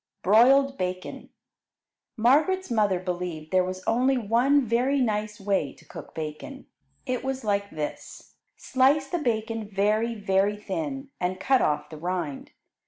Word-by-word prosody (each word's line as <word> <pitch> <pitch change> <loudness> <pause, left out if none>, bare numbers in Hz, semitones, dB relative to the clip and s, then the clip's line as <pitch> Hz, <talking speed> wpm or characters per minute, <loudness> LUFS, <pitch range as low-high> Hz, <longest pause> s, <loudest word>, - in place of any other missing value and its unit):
Broiled 265 +7 +5
Bacon 185 0 -4 0.9
Margaret's 300 +10 +2
mother 205 -5 +2
believed 175 -4 -5
there 185 -1 +4
was 185 0 -5
only 255 +3 +2
one 250 +5 +2
very 250 +5 +1
nice 215 -3 -1
way 195 -8 -1
to - - -20
cook - - -11
bacon. 160 - -7 0.4
It 255 -2 -2
was 265 -1 -3
like 200 -1 0
this: 150 -4 -7 0.2
Slice 275 +2 +2
the 350 - -1
bacon 225 -4 -2
very, 215 +3 +1
very 200 0 +1
thin, 275 +4 -5
and 185 +1 -2
cut 265 +5 +3
off 150 +2 0
the 155 - -8
rind. 170 -5 -4
215 Hz, 140 wpm, -26 LUFS, 185-265 Hz, 0.9 s, Broiled